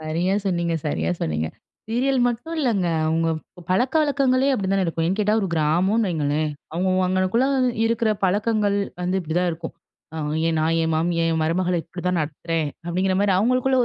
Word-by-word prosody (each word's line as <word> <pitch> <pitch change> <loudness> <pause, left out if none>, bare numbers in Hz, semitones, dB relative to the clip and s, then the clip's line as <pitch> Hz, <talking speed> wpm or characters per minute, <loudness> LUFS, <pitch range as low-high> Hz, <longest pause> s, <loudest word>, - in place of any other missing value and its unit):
சரியா 165 +5 -1
சொன்னீங்க 170 -2 0
சரியா 150 - -1
சொன்னீங்க. 80 0 -1 0.4
சீரியல் 255 +3 +1
மட்டும் 320 +8 -4
இல்லங்க. 220 - +1 0.2
அவங்க 165 +1 +1 0.3
ப - - -12
பழக்கவழக்கங்களே 270 +3 +2
அப்படி 195 -5 -2
தான 195 -1 +2
இருக்கும். 165 -1 -1
ஏன்னு 190 +4 -1
கேட்டா, 210 +1 +2
ஒரு 195 - -1
கிராமனு 180 +8 +2
வைங்களேன். 150 -1 0 0.2
அவங்க 185 +3 0 0.2
அங்கனக்குள்ள 185 +7 +1 0.4
இருக்கிற 230 -1 +1
பழக்கங்கள் 205 +1 +1 0.3
வந்து 185 +2 0
இப்படிதான் 175 +2 0
இருக்கும். 165 0 -7 0.4
அ - - -5 0.3
"என் 160 -1 0
நான் 165 +1 +1
என் 160 0 0
மாமிய 165 +1 0
என் 160 - 0
மருமகள 175 +2 +1
இப்படிதான் 180 +1 -2
நடத்துறேன்." 160 +1 -2 0.2
அப்படிங்கிற 185 +2 0
மாரி 205 -1 +3
அவங்களுக்குள்ள 255 +5 +2
185 Hz, 160 wpm, -23 LUFS, 165-220 Hz, 0.4 s, மாரி